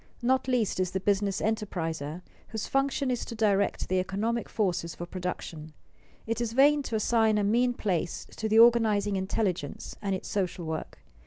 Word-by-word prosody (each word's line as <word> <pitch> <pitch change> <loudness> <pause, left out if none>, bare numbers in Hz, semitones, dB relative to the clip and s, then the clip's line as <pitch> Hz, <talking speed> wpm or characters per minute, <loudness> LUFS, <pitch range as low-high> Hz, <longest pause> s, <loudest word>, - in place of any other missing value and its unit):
Not 260 +2 +2
least 240 -7 +1
is 185 -1 +1
the 190 - -2
business 200 0 0
enterpriser, 175 -7 -2 0.2
whose 220 -1 -4
function 275 -1 0
is 245 - -1
to 230 - -7
direct 205 -3 +1
the 185 0 +1
economic 215 +5 -2
forces 180 -5 -1
for 175 - -6
production. 175 -4 -6 0.5
It 230 +1 -2
is 230 -1 -2
vain 290 +3 +5
to 235 - -4
assign 220 0 +3
a 210 - +1
mean 240 +4 +2
place 180 -6 -2
to 220 - -2
the 220 - +3
organizing 220 -3 +5
intelligence 190 -5 -2
and 195 -2 -1
its 185 - -6
social 185 -3 -2
work. 160 0 -5
205 Hz, 170 wpm, -28 LUFS, 185-230 Hz, 0.5 s, vain